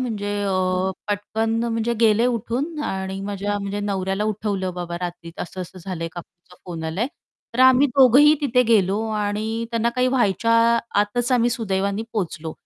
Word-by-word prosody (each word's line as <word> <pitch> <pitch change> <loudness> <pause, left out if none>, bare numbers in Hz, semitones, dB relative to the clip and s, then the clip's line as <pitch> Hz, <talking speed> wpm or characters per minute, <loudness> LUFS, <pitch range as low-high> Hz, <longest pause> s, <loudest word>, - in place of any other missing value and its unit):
म्हणजे 215 -5 -3
अ, 185 -1 0 0.2
पटकन 210 +2 -1
म्हणजे 230 0 -1
गेले 225 +1 +4
उठून 250 +7 -2
आणि 190 -2 -3
माझ्या 205 +1 -3
म्हणजे 200 0 -4
नवऱ्याला 195 0 -1
उठवलं 200 -3 -2
बाबा 175 -1 -5
रात्री 175 -1 -6
असं-असं 185 0 -7
झालंय 165 -3 -4
काकूंचा 175 +1 -13
फोन 165 -2 -6
आलाय. 185 +10 -1 0.5
तर 250 - 0
आम्ही 260 +2 +6
दोघंही 275 +3 +7
तिथे 250 -3 +3
गेलो 210 -3 +2
आणि 215 +2 -2
त्यांना 230 0 +1
काही 250 0 +3
व्हायच्या 230 -3 +1 0.5
आतच 240 +5 0
आम्ही 240 -1 +3
सुदैवाने 200 -2 -1
पोहोचलो. 165 -6 -3
205 Hz, 145 wpm, -22 LUFS, 190-235 Hz, 0.5 s, दोघंही